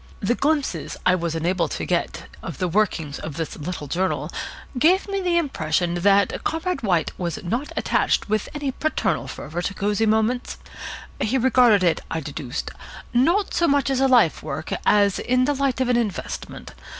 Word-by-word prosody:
The 205 +4 +1
glimpses 290 +2 -1
I 180 - +5
was 170 -2 -1
enabled 175 +4 0
to - - -3
get - - -1 0.2
of - - -6
the 185 - 0
workings 170 -6 0
of 155 - -6
this 165 -2 -3
little 160 0 -5
journal 180 +6 -1 0.5
gave 360 +9 +4
me 395 -1 -2
the 350 -2 +1
impression 175 - 0
that 195 +2 +2
Comrade 335 +3 -1
White 175 -7 +1
was 170 -2 -2
not 240 +11 -2
attached - - +1
with 215 0 -1
any 290 -2 -2
paternal 310 +4 -1
fervour 160 +4 -5
to 195 +2 -3
Cosy 210 +3 +1
Moments. 220 +3 +1 0.6
He 240 +5 +1
regarded 245 -5 +5
it, 170 -2 +2
I 165 - -2
deduced, 145 -4 -5 0.4
not 340 +12 +2
so 340 - +2
much 280 -2 +2
as 265 - +1
a 270 - +4
life 240 -11 +4
work 155 +1 -4
as 205 -2 +4
in 255 +1 +2
the 290 - +2
light 275 -2 0
of 260 - +1
an 245 -1 +3
investment. 220 -5 -4
215 Hz, 175 wpm, -23 LUFS, 175-265 Hz, 0.6 s, I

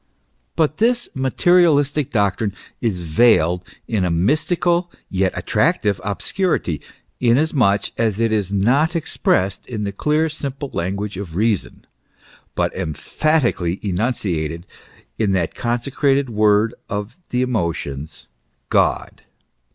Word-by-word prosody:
But 155 -1 +1
this 240 +2 +2
materialistic 145 0 +3
doctrine 100 -3 0 0.3
is 105 -7 -1
veiled 85 0 +3 0.2
in 105 -5 0
a 90 - +1
mystical 170 - +1 0.2
yet 95 -1 +1
attractive 100 -2 +1
obscurity, 100 - -1 0.4
inasmuch 120 -5 +2
as 110 -3 +1
it 115 -1 +2
is 105 -3 0
not 135 - +2
expressed 95 - 0
in 110 -4 -4
the 100 - -2
clear, 150 +9 +1
simple 140 -2 -5
language 100 +3 -3
of 90 -5 -6
reason, 105 0 -1 0.7
but - - 0
emphatically 100 - 0
enunciated 90 -5 -2 0.5
in 100 -3 +2
that 90 -3 0
consecrated 135 +2 0
word 105 +1 +3 0.2
of 105 +3 -4
the 125 +1 +1
emotions 85 - -3 0.4
God. - - +1
110 Hz, 110 wpm, -20 LUFS, 95-140 Hz, 0.7 s, materialistic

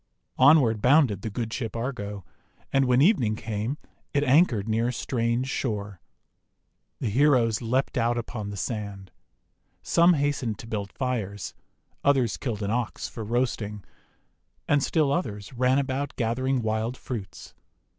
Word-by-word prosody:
Onward 130 -6 +5
bounded 125 - +4
the 110 - -3
good 115 +1 -4
Ship 115 -5 -4
Argo, 105 -6 -4 0.5
and 135 -1 +4
when 125 +1 +4
evening 130 - +3
came 110 +5 -3 0.4
it 145 - +3
anchored 130 - +3
near 115 +2 +1
a - - 0
strange 120 +1 -1
shore. 105 -8 -3 1.0
The 120 - -1
heroes 125 -3 +3
leaped 130 +3 0
out 120 +1 +1
upon 110 -3 -4
the 100 - -6
sand. 100 -4 -5 0.7
Some 170 +1 +5
hastened 140 -7 -1
to - - -10
build 105 -3 -4
fires, 105 -6 -3 0.5
others 135 -5 +2
killed 110 -6 -3
an 100 - -1
Ox 120 -1 -2
for 115 - -7
roasting, 110 -3 -2 0.8
and 145 -1 +3
still 150 0 +2
others 110 - -3
ran 130 +2 +2
about 140 0 -2
gathering 130 +2 0
wild 110 +3 -1
fruits. 110 -7 -7
120 Hz, 140 wpm, -26 LUFS, 105-135 Hz, 1.0 s, Onward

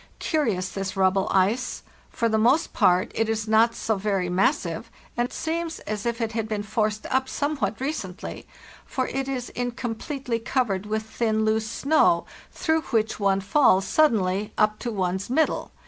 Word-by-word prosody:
Curious 220 - 0
this 195 0 -4
rubble 190 0 +3
ice. 210 +7 +1 0.3
For 230 - 0
the 220 -1 +1
most 255 +8 +3
part 180 +1 +3
it 225 0 0
is 220 -1 -1
not 225 +1 +4
so 220 -2 -1
very 195 -3 -1
mas 180 +2 +3
sive, 170 +6 -6 0.3
and 240 +1 -1
seems 330 0 -3
as 215 +1 -4
if 235 0 -1
it 225 -2 -1
had 225 -1 -3
been 210 -1 -2
forced 215 0 -1
up 260 0 +1
somewhat 285 -7 -1
recently, 250 - -5 0.4
for 260 -3 -2
it 270 0 -2
is 255 -3 -3
incompletely 245 +1 -3
covered 220 -5 -1
with 220 +1 -1
thin, 220 -1 0
loose 220 0 +1
snow, 310 +8 +3 0.3
through 320 0 0
which 220 -3 0
one 195 -1 +2
falls 195 -2 +4
suddenly 210 -8 +2
up 215 0 +2
to 240 - -3
one's 190 -1 -2
mid 315 +5 +4
dle. - - -5
220 Hz, 170 wpm, -25 LUFS, 200-255 Hz, 0.4 s, not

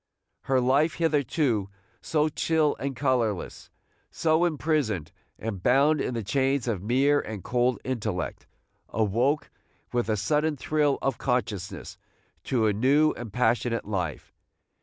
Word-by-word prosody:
Her 135 -1 +2
life, 135 +6 +2
hitherto 145 - +1 0.3
so 155 -1 +1
chill 155 0 +1
and 135 0 -3
colorless, 120 -7 -1 0.4
so 160 +1 +2
imprisoned 145 - -1 0.3
and 105 -4 -5
bound 140 +7 +3
in 125 - -2
the 115 - -2
chains 135 +3 0
of 105 -6 -1
mere 135 +7 +3
and 105 -5 -6
cold 125 0 +1
intellect, 110 -9 -3 0.4
awoke 120 +7 0 0.4
with 120 -2 0
a 110 - +1
sudden 150 +8 0
thrill 145 0 +1
of 135 -3 -1
consciousness 105 -7 -3 0.5
to 120 -4 +1
a 105 - +3
new 140 +8 +3
and 115 -3 -8
passionate 120 0 +1
life. 90 -8 -4
125 Hz, 130 wpm, -26 LUFS, 110-145 Hz, 0.5 s, bound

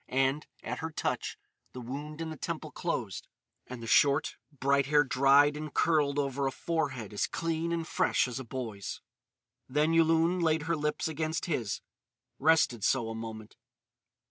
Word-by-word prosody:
And, 135 +3 +1 0.2
at - - -4
her 160 - -3
touch, 160 - -2 0.4
the 125 - -7
wound 145 +6 -6
in 160 -1 -3
the - - -5
temple - - -5
closed - - -3 0.4
and 125 -2 -7
the - - -5
short, 140 +6 +3 0.2
bright 140 -1 +1
hair 145 0 +5
dried 140 +2 +5
and 150 0 -5
curled 145 -3 +2
over 140 -1 0
a - - -1
forehead 135 -9 -2
as 100 - 0
clean 165 0 -2
and 165 -1 -2
fresh - - +2
as 125 +1 -5
a - - -5
boy's. 115 -5 -5 0.7
Then 150 +4 +2
Yulun 165 +2 +3
laid 160 -2 +2
her 165 +2 0
lips 150 0 -1
against 160 +1 -2
his, 120 - -2 0.6
rested 150 -8 +3
so 120 -4 +2
a - - -4
moment. 110 -1 -8
145 Hz, 165 wpm, -30 LUFS, 130-160 Hz, 0.7 s, hair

